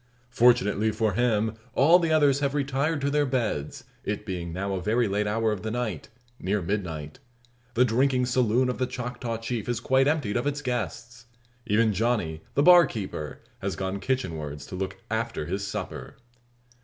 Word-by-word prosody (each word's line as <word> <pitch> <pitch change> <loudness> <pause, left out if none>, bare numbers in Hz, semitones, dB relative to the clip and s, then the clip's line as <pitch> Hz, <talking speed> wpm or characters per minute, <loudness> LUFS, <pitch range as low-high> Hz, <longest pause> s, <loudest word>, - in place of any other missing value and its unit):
Fortunately 115 -3 +4
for 110 -1 0
him, 110 -1 +1 0.2
all 165 +7 +6
the 165 -2 0
others 145 -3 +4
have 140 0 0
retired 140 +2 0
to 140 +1 0
their 150 0 +3
beds, 115 - -2 0.2
it - - -3
being 85 -2 -4
now 100 +3 -3
a 95 - -2
very 115 +4 +1
late 105 +1 0
hour 110 +1 +1
of 105 -3 -3
the 110 - -3
night 110 -8 -3 0.3
near 100 +3 0
midnight. 85 -6 -4 0.6
The 125 +2 +5
drinking 125 +2 +2
"saloon" 125 0 +2
of 125 - -2
the 130 - +1
Choctaw 125 -2 -4
Chief 115 0 -4
is 120 -2 0
quite 130 +3 +3
emptied 145 -9 +1
of 120 +4 -1
its 145 0 -2
guests. 120 - -4 0.4
Even 110 +1 +3
Johnny, 100 -7 0
the 140 - +4
bar 175 -1 +8
keeper, 95 - -6 0.2
has - - -3
gone 95 +1 -3
kitchen 125 -7 -1
wards 75 -1 -6
to - - -8
look 95 +1 -4
after 110 -6 -2
his 100 +4 -3
supper. 100 - -6
115 Hz, 180 wpm, -26 LUFS, 100-130 Hz, 0.6 s, bar